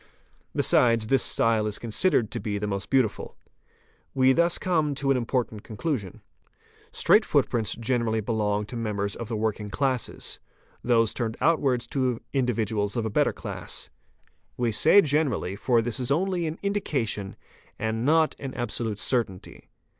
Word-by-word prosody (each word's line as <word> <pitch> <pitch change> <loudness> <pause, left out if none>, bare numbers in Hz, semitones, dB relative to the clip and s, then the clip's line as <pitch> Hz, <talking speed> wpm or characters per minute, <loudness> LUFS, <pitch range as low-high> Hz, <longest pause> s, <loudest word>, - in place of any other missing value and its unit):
Besides, 115 -2 +3
this 135 -2 +4
style 110 -2 +1
is 105 - -3
considered 115 - 0
to - - -3
be 105 0 -3
the 105 - -3
most 100 -3 -4
beautiful. 130 -6 0 0.8
We 130 0 +5
thus 170 +3 +3
come 155 -5 0
to 135 0 0
an - - +3
im 120 -2 -3
portant 115 -5 -2
conclusion. 110 - -4 0.7
Straight - - +4
footprints 110 -3 +1
generally 115 -1 0
belong 105 -1 -1
to 120 - -9
members 105 -3 -2
of 115 - -6
the 115 -1 -3
working 105 -1 -2
classes, 130 +4 -2 0.4
those 115 -2 +3
turned 115 -2 -3
outwards 135 -5 +2
to 130 -4 0
individuals 110 -5 0
of 115 - -1
a 110 - -2
better - - +2
class. - - -6 0.7
We 120 -2 0
say 200 - +6
"generally'', 145 - 0
for 115 +2 +1
this 120 +2 -1
is 125 -1 -2
only 175 +3 0
an 155 +2 -4
"indication" 135 - -2 0.4
and 110 +1 -2
not 160 +3 +3
an 135 -2 -6
absolute 115 -3 -2
certainty. 105 -5 -2
115 Hz, 155 wpm, -26 LUFS, 110-135 Hz, 0.8 s, say